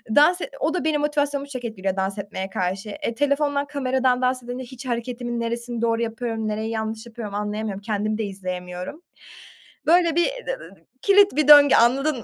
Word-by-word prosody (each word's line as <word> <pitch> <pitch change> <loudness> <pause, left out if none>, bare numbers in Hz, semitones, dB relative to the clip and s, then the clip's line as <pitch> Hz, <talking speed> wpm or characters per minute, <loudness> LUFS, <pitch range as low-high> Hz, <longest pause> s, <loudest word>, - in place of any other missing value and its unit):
dans 345 +5 +5
e - - -4
o 310 - 0
da 360 - -1
benim 305 -1 +1
motivasyonumu 290 -1 -1
çok 255 -3 -6
etkiliyor 195 -4 -3
dans 195 +1 -2
etmeye 195 -1 -5
karşı. 190 +3 -3
E, 225 +3 -4
telefondan, 285 +1 +1
kameradan 260 -3 +1
dans 255 0 0
edince 245 +2 -5
hiç 260 +1 -10
hareketimin 240 0 -3
neresini 235 0 -3
doğru 230 0 +1
yapıyorum, 225 -1 -3
nereyi 215 +1 -2
yanlış 220 0 -3
yapıyorum 235 0 -10
anlayamıyorum. 210 -1 -3
Kendimi 215 0 -1
de 220 - -2
izleyemiyorum. 185 - -6 0.9
Böyle, 340 -1 +4
bir 345 +5 +3 0.7
kilit 400 -5 +5
bir 305 -2 +2
döngü, 290 -1 +9
anladın 270 +5 +3
mı? 235 - -8
240 Hz, 170 wpm, -23 LUFS, 215-285 Hz, 0.9 s, döngü